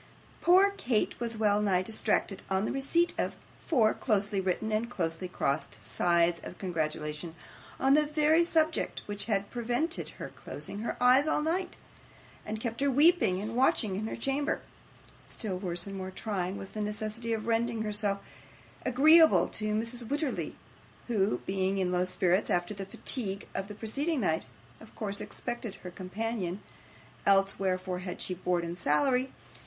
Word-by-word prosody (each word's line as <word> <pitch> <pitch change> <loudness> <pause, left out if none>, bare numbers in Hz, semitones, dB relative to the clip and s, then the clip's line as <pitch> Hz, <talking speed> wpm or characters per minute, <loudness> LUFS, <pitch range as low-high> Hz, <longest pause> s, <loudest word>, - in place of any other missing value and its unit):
Poor 375 +3 +6
Kate 250 - -1
was 235 -1 -3
well 210 -1 +3
nigh 190 -3 +2
distracted 195 -1 0
on 190 +2 +1
the - - -1
receipt 310 +6 +2
of - - -1 0.3
four 230 -9 +3
closely 205 -3 0
written 190 +4 -1
and 220 +2 0
closely 170 -5 -2
crossed 140 -9 -1
sides 170 - +2
of - - -8
congratulation 155 -2 -3 0.4
on 270 +1 +4
the 300 +1 +4
very 305 +2 +4
subject 320 -1 +1
which 205 -1 -4
had 200 -2 -1
prevented 245 +8 -2
her - - -6
closing 200 - -6
her 225 - -3
eyes 255 +4 +5
all 310 - +2
night, 350 +4 -1 0.7
and 215 +1 -3
kept 230 +2 -3
her 280 - +3
weeping 275 - +4
and 215 +3 -4
watching 230 -5 +2
in 215 +3 -2
her - - -4
chamber; 275 +5 -1 0.7
still 190 -5 -3
worse 175 -2 -3
and 195 -1 -6
more 185 0 -4
trying 190 -1 -3
was 195 - -6
the 215 - -5
necessity 215 +2 -3
of 220 -1 -1
rendering 230 0 0
herself 205 -1 +1 0.7
agreeable 315 +6 +6
to 215 0 -3
Mrs. 230 +2 -3
Wititterly, 290 0 -1 0.5
who, 210 -3 +1
being 190 0 0
in 185 -2 0
low 180 0 +2
spirits 185 +1 +1
after 175 +3 0
the 195 -1 -6
fatigue 200 -2 -3
of 195 - -3
the 210 - -8
preceding 275 +8 -1
night, 160 -7 0 0.3
of 220 - -15
course 200 -2 -3
expected 240 -4 -5
her 180 - -9
companion 190 0 -3 0.6
(else 195 0 +3
wherefore 185 -1 -1
had 180 -1 -6
she 185 - -2
board 180 -1 0
and 170 +1 -5
salary?) 255 - +2
210 Hz, 160 wpm, -30 LUFS, 185-245 Hz, 0.7 s, Poor